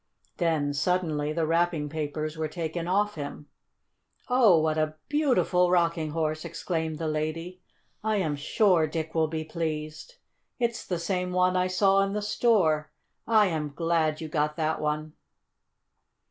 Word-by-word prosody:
Then, 155 -5 +1
suddenly, 150 -1 0
the 160 +1 0
wrapping 165 -2 +1
papers 155 0 -4
were 160 -1 -2
taken 165 +2 -4
off 205 +3 +1
him. 145 0 -7 0.8
"Oh, 235 -9 +5
what 155 0 +1
a 155 0 -1
beautiful 255 - +2
Rocking 170 -3 +1
Horse!" 155 0 -2
exclaimed 160 -3 -3
the 160 - -3
lady. 160 +4 -3 0.4
"I 220 0 +1
am 160 -7 0
sure 165 +2 +2
Dick 160 +1 -4
will 160 -1 +2
be 155 0 -3
pleased. 155 - -5 0.4
It's 235 -2 -1
the 180 - -1
same 180 +1 -2
one 185 0 +3
I 180 0 +2
saw 195 +1 +3
in 195 0 0
the 210 0 -2
store. 170 -9 +2 0.4
I 220 -2 +5
am 150 -3 -3
glad 165 -1 0
you 160 - -4
got 150 0 -1
that 155 0 -1
one!" 150 0 -2
165 Hz, 150 wpm, -27 LUFS, 155-180 Hz, 0.8 s, Oh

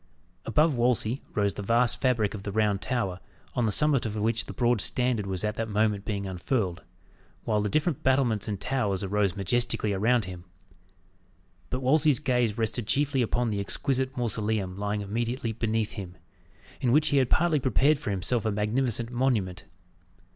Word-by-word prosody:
Above 150 +5 +3
Wolsey 120 0 +1
rose 100 -1 +1
the - - -6
vast 115 +3 +2
fabric 115 -6 +1
of 105 - -6
the 100 - -5
Round 105 -2 +1
Tower, 95 -4 -2 0.3
on 120 -2 +1
the - - +1
summit 145 +3 +2
of 110 -2 -3
which 110 +1 0
the - - -7
broad 120 -3 +1
standard 125 -4 0
was 95 -1 -2
at 105 0 -2
that 115 0 -2
moment 105 -1 +1
being 100 -2 -3
unfurled; 95 0 -2 0.6
while 105 -2 +1
the 105 - -1
different 155 - 0
battlements 130 -6 +1
and 100 -3 -3
towers 105 -6 -1
arose 100 -1 0
majestically 105 +1 0
around. 110 +3 +2 1.4
But 130 +1 -3
Wolsey's 150 +1 +4
gaze 125 -5 0
rested 115 0 -1
chiefly 140 +2 +1
upon 120 0 0
the 100 - -1
exquisite 130 +5 -2
mausoleum 110 -5 -1
lying 105 +1 -2
immediately 115 +4 -2
beneath 110 -1 -1
him; 95 -2 -8 0.6
in 125 -4 +1
which 150 +3 +4
he 145 - +2
had 130 -2 +3
partly 170 -3 +3
prepared 140 +3 +2
for 150 - -4
himself 100 +4 0
a 110 - 0
magnificent 115 +3 0
monument. 120 -8 0
115 Hz, 170 wpm, -27 LUFS, 105-125 Hz, 1.4 s, Wolsey's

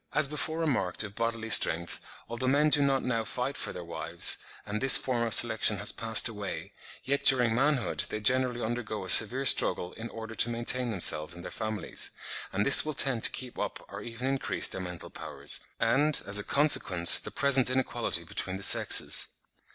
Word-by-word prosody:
As - - +2
before 155 +2 -5
remarked 120 - -3
of 105 -2 -10
bodily 115 0 -5
strength, 85 -3 +3 0.3
although 120 +2 -5
men 145 +3 0
do 145 - +4
not 135 -1 -1
now 115 -3 -3
fight 125 +5 -5
for - - -5
their 90 - -10
wives, 85 - 0 0.3
and 105 +1 -6
this 135 0 +6
form 125 -3 -4
of 115 -1 -3
selection - - +4
has - - +2
passed 115 0 +1
away, 105 -4 -9 0.3
yet 140 +2 -3
during 125 -4 +3
manhood, 135 0 -2
they 110 - -6
generally 125 +2 -1
undergo 110 -3 -6
a 95 - +2
severe 125 +5 +6
struggle 90 -7 +2
in 115 +1 -10
order 110 0 -10
to 115 - +1
maintain 120 +1 0
themselves 85 -5 0
and 85 - -13
their - - -10
families; 110 -1 -5 0.4
and 100 +2 -3
this 140 - +7
will 155 -1 -6
tend 135 -5 +3
to - - +7
keep 125 -2 -8
up - - -7
or 100 +1 -10
even 115 +2 -9
increase 135 -9 -1
their - - -7
mental 90 -2 -10
powers, - - -3 0.2
and, 140 +6 0
as 100 +1 -1
a - - -7
consequence, 95 - +2
the - - -8
present 135 -3 +1
inequality 120 -8 -3
between 95 +3 -5
the 100 - -9
sexes. - - +4
115 Hz, 190 wpm, -26 LUFS, 105-130 Hz, 0.4 s, this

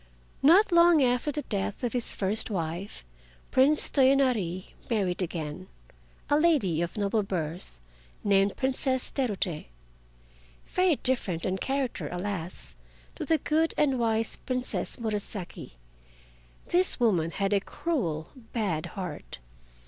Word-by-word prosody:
Not 365 +8 +6
long 340 -3 +6
after 250 +3 +1
the 295 +1 -4
death 205 +2 -3
of 240 - -1
his 245 -2 0
first 205 +4 0
wife, 170 - -4 0.5
Prince 280 +4 +4
Toyonari 255 - +2 0.2
married 195 -6 0
again, 165 0 -4 0.6
a 290 0 +3
lady 270 - +2
of 175 +5 -3
noble 205 +1 +1
birth 170 - -4 0.4
named 195 0 +3
Princess 260 -1 0
Terute. 200 - -2 1.0
Very 365 -3 +2
different 200 -10 +1
in 190 0 0
character, 270 0 -2
alas! 180 -1 -3 0.4
to 315 - -5
the 320 +3 +3
good 315 +2 +1
and 270 -4 +2
wise 225 -1 0
Princess 255 -1 -2
Murasaki, 210 - -4 1.0
this 360 -3 +2
woman 185 -9 +2
had 195 +3 -1
a 200 - +4
cruel, 190 - -3 0.2
bad 190 -9 -1
heart. 180 -6 -6
220 Hz, 120 wpm, -28 LUFS, 185-270 Hz, 1.0 s, Not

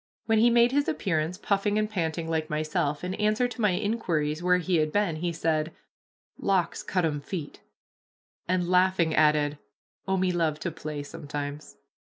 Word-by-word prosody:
When 220 -1 +3
he 235 +2 +6
made 235 +1 +5
his 285 +1 +1
appearance, 165 -1 -1
puffing 205 +1 0
and 215 0 +1
panting 165 -5 -2
like 160 -1 -1
myself, 150 -1 -1
in 180 +1 -2
answer 215 +4 +1
to 245 -1 -7
my 210 -3 +3
inquiries 165 -8 -1
where 180 0 +4
he 180 0 0
had 155 -1 +1
been, 200 -5 +1
he 175 +2 -1
said, 160 -1 0 0.7
"Locks 185 -4 0
cut 180 -3 0
'em 145 -2 -1
feet," 155 -1 -6 0.9
and, 180 -1 +1
laughing, 180 -2 +3
added, 150 -1 +3 0.5
"Oh, 190 0 +1
me 185 0 +1
love 160 -3 0
to 170 - -2
play 150 -2 -6
sometimes." 145 0 -6
170 Hz, 170 wpm, -27 LUFS, 155-195 Hz, 0.9 s, he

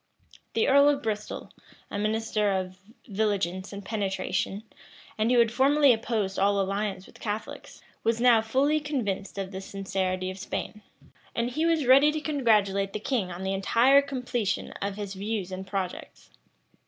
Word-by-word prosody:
The 225 - +2
earl 280 +1 +6
of 285 -1 0
Bristol, 210 -1 -4 0.4
a 205 - -3
minister 215 -1 0
of 185 -1 -3 0.3
vigilance 195 -3 -1
and 200 -1 -8
penetration, 195 -1 -2 0.5
and 220 +1 +1
who 250 - +4
had 230 -2 +4
formerly 275 +2 +5
opposed 220 -4 -2
all 200 +1 +3
alliance 195 -1 -2
with - - -17
Catholics,[*] 210 0 -6 0.2
was 230 0 +1
now 240 -2 +5
fully 270 +7 +2
convinced 230 -11 -3
of 195 -1 -4
the 190 -1 -6
sincerity 190 -1 -2
of 185 - -10
Spain; 210 +1 -5 0.5
and 235 +1 -1
he 315 +6 0
was 325 -4 +2
ready 275 +4 +6
to 310 - -2
congratulate 210 -10 +1
the - - -3
king 215 -4 -1
on 175 +2 -6
the 190 0 -1
entire 235 +8 +4
completion 250 -6 -2
of 200 0 -2
his 200 -1 -5
views 200 -1 -3
and 190 +1 -6
projects. 190 -2 -5
210 Hz, 160 wpm, -27 LUFS, 195-245 Hz, 0.5 s, earl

